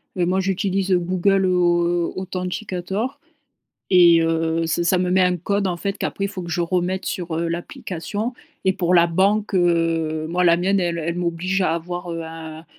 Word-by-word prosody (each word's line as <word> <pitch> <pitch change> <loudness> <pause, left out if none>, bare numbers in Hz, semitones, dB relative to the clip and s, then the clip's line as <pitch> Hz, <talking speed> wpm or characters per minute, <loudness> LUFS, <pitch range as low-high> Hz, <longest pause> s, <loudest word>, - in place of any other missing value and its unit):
Et 180 -2 +1
moi, 185 +2 +1
j'utilise, 195 0 -1
heu, 180 - +4
Google 185 +2 +1
Authenticator 180 +4 -1 0.7
et 170 -2 +7
heu, 165 0 0
ç 170 +1 0
ça 180 +1 +3
me 180 0 0
met 185 0 +4
un 180 0 +2
code, 200 +3 -1
en 180 - -1
fait, 195 +3 -3
qu'après 200 - -2
faut 190 -3 -6
que 170 - -7
je 175 +1 -1
remette 180 +2 -1
sur, 175 -3 -3
heu, 170 0 -1
l'application. 185 +6 -4 0.3
Et 190 - +4
pour 180 -1 0
la 170 -1 +6
banque, 200 +4 +1
heu, 165 -3 +1
moi, 180 +2 +1
la 170 -1 +5
mienne, 195 +3 +1
elle 170 -1 -1
elle 170 +2 -2
m'oblige 175 +2 -1
à 165 -2 +1
avoir, 175 +1 -5
heu, 165 0 -4
un 160 0 -9
180 Hz, 185 wpm, -22 LUFS, 170-190 Hz, 0.7 s, et